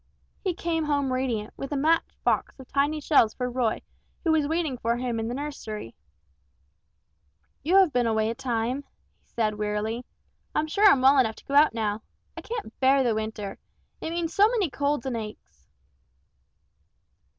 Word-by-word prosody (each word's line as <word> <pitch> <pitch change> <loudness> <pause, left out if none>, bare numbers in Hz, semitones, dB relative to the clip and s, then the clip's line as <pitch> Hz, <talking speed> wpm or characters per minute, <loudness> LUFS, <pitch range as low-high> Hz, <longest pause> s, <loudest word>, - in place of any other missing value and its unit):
He 370 -4 -1
came 330 -2 -1
home 285 -3 0
radiant, 240 -5 -2
with 275 - -6
a 290 - 0
match 320 +4 +3 0.2
box - - +1
full 265 - -11
of - - -22
tiny 285 +3 +1
shells 280 -7 +3
for 250 -1 -2
Roy 240 -3 0 0.4
who 330 - +2
was 310 -2 +2
waiting 315 -5 -1
for 235 +1 0
him 240 -2 -2
in 225 - -2
the 240 - -3
nursery. 220 - -6 1.7
"You 345 +6 +1
have 380 -6 +6
been 245 -1 +2
away 220 0 +1
a - - -2
time," 245 +1 -2 0.4
he - - -39
said, 215 -2 -1
wearily: 210 +3 -2 0.5
"I'm 305 - +2
sure 400 +7 +4
I'm 270 - +4
well 270 +1 +7
enough 220 -4 +2
to - - -16
go 275 - -6
out 290 -4 +5
now. 215 -1 -1 0.3
I - - -7
can't 450 - -6
bear 270 +1 +4
the 240 -3 +2
winter. 215 -2 -4 0.4
It - - -3
means 335 -1 -2
so 410 +1 +6
many 430 - 0
colds 285 -1 -1
and 260 -2 -2
aches." 210 - -9
260 Hz, 180 wpm, -26 LUFS, 225-300 Hz, 1.7 s, well